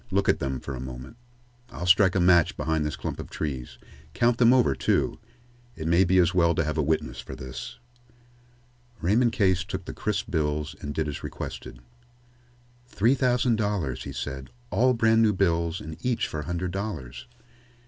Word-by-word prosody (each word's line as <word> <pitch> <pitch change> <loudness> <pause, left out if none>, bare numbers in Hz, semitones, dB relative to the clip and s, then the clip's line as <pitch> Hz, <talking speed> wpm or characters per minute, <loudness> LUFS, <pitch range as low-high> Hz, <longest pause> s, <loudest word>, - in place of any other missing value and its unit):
Look 100 -1 +1
at - - +3
them 65 -1 -2
for 70 - -6
a 65 - -5
moment. 65 - -8 0.5
I'll 85 - -6
strike 95 +1 +5
a - - +3
match 85 -2 +4
behind 80 -1 0
this 75 - -4
clump - - -5
of - - -7
trees. 65 -5 -5 0.4
Count 120 -1 +2
them 120 -1 +6
over, 125 -1 +4
too. - - 0 0.6
It 80 - -6
may 85 +3 +4
be 95 +2 +3
as 90 0 +4
well 85 -2 +3
to 85 - +1
have 75 0 -2
a - - +4
witness 70 -4 -1
for - - -8
this." 65 -1 -8 1.2
Raymond 115 +7 +2
Case 95 -3 +2
took - - -6
the - - -6
crisp 105 -2 -3
bills 75 -2 -1
and 75 0 -5
did 80 -1 -1
as 75 - -5
requested. - - -7 1.1
"Three 120 +2 +2
thousand 125 -3 +2
dollars," 95 - -1
he - - -5
said. 65 0 -5 0.2
"All 125 +2 +3
brand 115 0 +4
new 110 -2 +4
bills 85 -3 +1
and 80 0 -7
each 125 -2 0
for 80 - -5
a 75 - -5
hundred 90 +2 -3
dollars." 80 - -5
85 Hz, 185 wpm, -26 LUFS, 75-105 Hz, 1.2 s, them